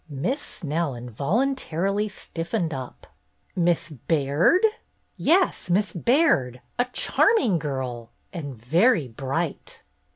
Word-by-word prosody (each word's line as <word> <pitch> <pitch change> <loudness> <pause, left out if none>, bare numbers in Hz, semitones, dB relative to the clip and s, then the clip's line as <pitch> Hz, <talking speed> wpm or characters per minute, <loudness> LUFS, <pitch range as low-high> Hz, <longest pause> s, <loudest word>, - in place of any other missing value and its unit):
Miss 175 - -2
Snell 160 - -3
involuntarily 195 - -1
stiffened 170 -2 -3
up. 130 -2 -7 0.5
"Miss 175 -2 +1
Baird?" 150 - +2 0.5
"Yes, 355 - +2
Miss 195 +3 +1
Baird. 175 - +2 0.2
A 245 - +4
charming 250 - +2
girl! 130 -6 -4
— - - -42
and 145 - -6
very 165 - +3
bright." 135 +7 -4
165 Hz, 100 wpm, -25 LUFS, 135-215 Hz, 0.5 s, A